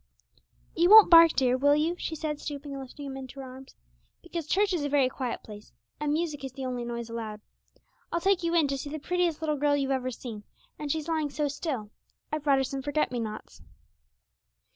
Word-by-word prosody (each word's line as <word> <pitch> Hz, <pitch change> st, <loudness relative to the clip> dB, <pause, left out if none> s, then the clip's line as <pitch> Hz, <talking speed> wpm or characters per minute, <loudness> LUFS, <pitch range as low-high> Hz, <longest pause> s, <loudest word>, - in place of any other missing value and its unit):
'You 345 Hz, +2 st, +3 dB
won't 430 Hz, -3 st, +10 dB
bark, 330 Hz, -1 st, +9 dB
dear, 255 Hz, -2 st, +2 dB
will 285 Hz, +2 st, +4 dB
you?' 320 Hz, +4 st, +1 dB
she 330 Hz, -, -4 dB
said 300 Hz, -1 st, -3 dB
stooping 285 Hz, -1 st, -6 dB
and 275 Hz, -, -5 dB
lifting 275 Hz, +2 st, -9 dB
him 270 Hz, -1 st, -6 dB
into 270 Hz, 0 st, -9 dB
her 270 Hz, -, -6 dB
arms; 260 Hz, +1 st, -12 dB, 0.5 s
'because 340 Hz, -3 st, -5 dB
church 400 Hz, +3 st, +2 dB
is 335 Hz, -5 st, -1 dB
a 290 Hz, -, -1 dB
very 280 Hz, -2 st, +3 dB
quiet 255 Hz, -2 st, -4 dB
place, 210 Hz, -1 st, -12 dB, 0.3 s
and 295 Hz, 0 st, -1 dB
music 305 Hz, -2 st, -2 dB
is 265 Hz, -2 st, -6 dB
the 265 Hz, 0 st, -6 dB
only 250 Hz, -1 st, -3 dB
noise 235 Hz, -1 st, -5 dB
allowed. 225 Hz, -2 st, -6 dB, 0.7 s
I'll 340 Hz, -, 0 dB
take 380 Hz, +1 st, +2 dB
you 335 Hz, 0 st, 0 dB
in 320 Hz, -4 st, +4 dB
to 275 Hz, 0 st, -2 dB
see 285 Hz, -, -6 dB
the 310 Hz, -, -4 dB
prettiest 345 Hz, 0 st, -1 dB
little 305 Hz, -2 st, 0 dB
girl 290 Hz, +1 st, +2 dB
you've 275 Hz, -1 st, -1 dB
ever 255 Hz, -1 st, 0 dB
seen, 225 Hz, -3 st, -8 dB, 0.4 s
and 295 Hz, -1 st, -3 dB
she's 315 Hz, 0 st, -2 dB
lying 315 Hz, -3 st, 0 dB
so 295 Hz, +1 st, -1 dB
still. 275 Hz, -7 st, -4 dB, 0.4 s
I've 305 Hz, -1 st, -2 dB
brought 280 Hz, -2 st, +4 dB
her 270 Hz, -, +2 dB
some 270 Hz, +1 st, -4 dB
forget 290 Hz, +1 st, 0 dB
me 245 Hz, -, -2 dB
nots.' 215 Hz, -2 st, -7 dB
285 Hz, 220 wpm, -28 LUFS, 260-315 Hz, 0.7 s, won't